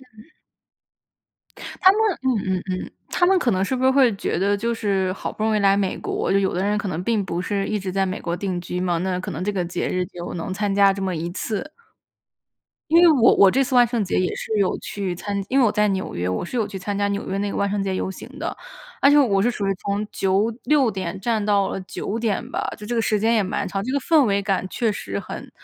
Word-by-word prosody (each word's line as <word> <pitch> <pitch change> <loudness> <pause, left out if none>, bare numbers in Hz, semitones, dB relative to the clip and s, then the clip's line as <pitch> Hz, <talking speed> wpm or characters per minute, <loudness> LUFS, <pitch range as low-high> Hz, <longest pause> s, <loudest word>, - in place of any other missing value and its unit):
嗯。 220 +9 -17 1.5
他 375 - +8
们 415 - -1 0.2
嗯 210 -8 0
嗯 - - -5
嗯， 185 - 0 0.3
他 355 - +2
们 380 +1 +4
可 245 - +1
能 190 -1 +1
是 260 - -1
不 255 - -2
是 260 - +5
会 260 -4 +4
觉 - - -2
得 200 +2 +2
就 230 +3 -1
是 195 -4 0
好 - - -5
不 215 - -5
容 220 0 +2
易 - - +2
来 195 -1 +4
美 195 -2 -1
国， - - -2
就 195 - +4
有 195 -1 0
的 180 - -1
人 205 +1 +1
可 205 - -3
能 175 -2 -3
并 220 -1 +1
不 175 -2 -3
是 195 +1 -1
一 215 - -1
直 190 -1 -4
在 195 +1 +1
美 185 +1 -3
国 170 0 -2
定 185 0 -3
居 180 +1 -4
嘛。 180 -2 0
那 180 0 -1
可 185 - -5
能 - - -4
这 205 - 0
个 190 -3 -1
节 175 +1 -3
日 180 0 -1
就 175 -1 -7
能 175 +2 -4
参 205 0 -1
加 200 0 +5
这 195 - -6
么 190 -2 -1
一 165 +2 -3
次。 220 - -4 1.2
因 330 +2 +6
为 350 - +7
我 255 -7 +5
我 195 - +7
这 270 +6 +2
次 260 - -3
万 245 -1 +7
圣 230 -2 -1
节 185 - -3
也 185 - 0
是 - - -5
有 195 -2 +1
去 195 -3 -4
参 200 +4 -5
因 270 - +2
为 265 - +5
我 215 - +3
在 210 0 +2
纽 190 -1 -2
约， 90 +1 -2
我 90 - -2
是 210 - -6
有 215 -3 0
去 195 -2 -6
参 200 +2 -4
加 200 0 +1
纽 200 0 -3
约 195 - -2
那 200 0 -1
个 - - -4
万 200 - +1
圣 205 0 -1
节 195 -1 -2
游 185 - -2
行 190 - -9
的。 335 +3 -3 0.5
而 280 - +6
且 295 - +6
我 205 -9 +3
是 240 - +2
属 210 -4 -3
于 195 - +1
从 200 +1 -1
9 195 +4 +1
6 285 -5 +3
点 190 -2 -4
站 220 +1 -1
到 200 -2 +2
了 - - -4
9 200 +3 -4
点 230 +2 -2
吧， - - -2 0.2
就 210 - -9
这 240 - -2
个 230 - +2
时 215 -1 +1
间 225 +3 +2
也 220 - +3
蛮 195 +1 -2
长， 195 +1 -3
这 240 - -3
个 280 - +2
氛 305 +1 +4
围 200 -1 +1
感 195 -1 -1
确 225 +2 0
实 100 - -5
很 - - -8
200 Hz, 285 characters per minute, -22 LUFS, 190-230 Hz, 1.5 s, 他